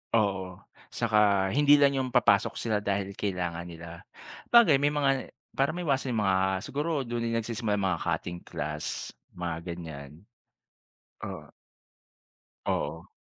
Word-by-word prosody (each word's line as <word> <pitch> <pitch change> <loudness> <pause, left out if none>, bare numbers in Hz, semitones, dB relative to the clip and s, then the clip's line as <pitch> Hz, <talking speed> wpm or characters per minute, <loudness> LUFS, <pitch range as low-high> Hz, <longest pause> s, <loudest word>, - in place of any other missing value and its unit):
Oo, 95 -4 0 0.3
'tsaka 100 -3 +2
hindi 145 +1 +6
lang 140 -1 +4
yung 130 - -3
papasok 115 -4 +3
sila 110 -2 0
dahil 100 -1 -2
kailangan 90 -4 -3
nila. 85 0 -10 0.5
'Bagay 190 - +6
may 145 - +4
mga 140 -3 0 0.2
para 135 +2 +1
ma-iwasan 140 -7 -1
yung 105 - +1
mga 95 -1 +3 0.3
siguro 150 0 -1
dun 120 0 -3
na 115 - 0
nag-sisimula 110 -2 -2
yung 95 -1 0
mga 85 - -4
cutting 85 0 -2
class, 75 +1 -4 0.2
mga 85 -2 -3
ganyan. 80 -5 -7 1.1
Oo. - - -7 1.2
Oo. 80 +3 -2
105 Hz, 130 wpm, -28 LUFS, 85-135 Hz, 1.2 s, hindi